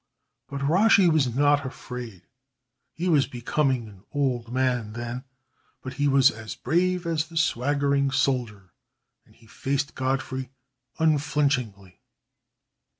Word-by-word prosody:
But 140 0 -5
Rashi 190 +6 +5
was 150 -4 +3
not 145 +1 +3
afraid. 125 -7 -8 0.7
He 175 +3 -4
was 145 -6 +3
becoming 125 0 -1
an 100 -2 -15
old 125 -5 -1
man 125 -4 0
then, 120 +3 -5 0.6
but 130 - -6
he 145 +1 0
was 135 -1 +5
as 110 0 -8
brave 180 +4 0
as 160 -2 -1
the 165 0 -9
swaggering 140 -1 +1
soldier, 125 -8 -1 0.5
and - - -23
he - - -22
faced 140 +5 -2
Godfrey 130 0 -2 0.5
unflinchingly. 140 - 0
135 Hz, 120 wpm, -25 LUFS, 120-145 Hz, 0.7 s, Rashi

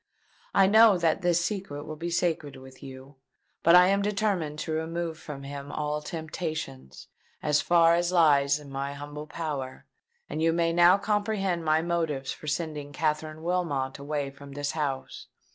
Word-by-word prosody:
I 195 - +6
know 215 0 +6
that 170 +2 +1
this 175 -1 +2
secret 185 -8 -4
will 155 0 -7
be 165 +3 -4
sacred 165 -4 -1
with 130 0 -14
you. 135 +1 -11 0.4
But 170 +1 +6
I 180 +1 +7
am 200 +1 +2
determined 200 -7 -1
to 160 - -4
remove 160 0 -3
from 140 -2 -8
him 140 0 -7
all 150 0 -2
temptations, 155 - -6 0.4
as 150 -1 +2
far 165 +2 +5
as 175 +1 +1
lies 145 -5 +4
in 145 -2 -12
my 140 +1 -3
humble 145 +1 -8
power; 145 -4 -5 0.4
and 155 - -4
you 165 0 +3
may 165 0 +1
now 175 +2 +6
comprehend 205 -4 -1
my 155 0 +2
motives 160 -6 -1
for 155 - -9
sending 150 -2 -3
Katherine 155 +1 -2
Wilmot 155 -7 -1
away 140 -1 -3
from 140 0 -12
this 145 0 -2
house. 145 -4 -4
155 Hz, 165 wpm, -27 LUFS, 145-175 Hz, 0.4 s, I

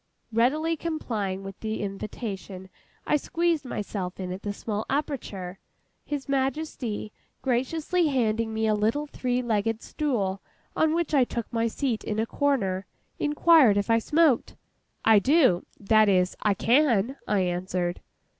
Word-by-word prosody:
Readily 300 +9 +2
complying 220 - -3
with 195 0 -8
the 220 -1 -3
invitation, 195 -2 -6 0.4
I 300 - +3
squeezed 330 0 0
myself 195 -6 -4
in 185 -1 -4
at 185 +2 -6
the 205 - -3
small 210 +1 -3
aperture. 220 - -3 0.4
His 290 -2 -4
Majesty, 265 -6 -2 0.3
graciously 310 +7 +1
handing 230 -5 0
me 220 0 -1
a 215 - +3
little 220 +8 +1
three 250 -3 -2
legged 225 -1 0
stool 205 -10 -1 0.3
on 315 0 +2
which 340 -2 -1
I 275 -3 +5
took 240 -1 -5
my 230 0 +1
seat 235 -1 -2
in 210 - -3
a 220 - +1
corner, 215 -9 0 0.3
inquired 295 -6 +5
if 205 +3 0
I 230 - +5
smoked. 300 +1 +2 0.5
'I 220 -2 +7
do;—that 215 - +3
is, 185 -1 +2
I 210 -2 +2
can,' 245 0 +2
I 205 -2 +2
answered. 180 0 -2
225 Hz, 140 wpm, -26 LUFS, 200-285 Hz, 0.5 s, I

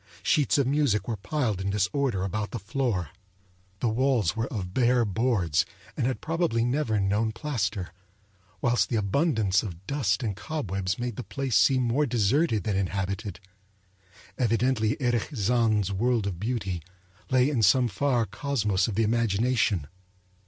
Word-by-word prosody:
Sheets 150 -1 +2
of 140 - +3
music 135 -6 +1
were 115 - -1
piled 110 - -2
in 95 - -2
disorder 105 +1 0
about 105 +2 -2
the - - -4
floor. 100 - -2 0.7
The 120 - +2
walls 120 -2 +1
were 115 +1 -1
of 95 -9 -5
bare 125 -1 +3
boards, 100 - +1 0.3
and 125 -5 0
had 130 - -2
probably 160 -8 0
never 120 -4 0
known 105 +3 +1
plaster; 110 - -3 0.7
whilst 120 -1 +2
the 120 - -1
abundance 105 - +2
of 95 -4 -8
dust 125 -6 0
and 105 -4 -2
cobwebs 100 - -3
made 120 -3 -4
the 125 - -4
place 135 -3 -3
seem 130 +3 +4
more 130 +5 +1
deserted 115 - +1
than 105 -3 -1
inhabited. 100 +2 -3 1.0
Evidently 115 -2 +1
Erich 120 -4 0
Zann's 110 -2 +2
world 115 +2 +1
of 95 -4 -3
beauty 100 -6 -2 0.5
lay 130 0 +4
in 140 -6 0
some 120 +5 +5
far 120 +2 +1
cosmos 105 -3 0
of 110 - -3
the 115 - +2
imagination. 110 - +1
115 Hz, 150 wpm, -27 LUFS, 100-130 Hz, 1.0 s, some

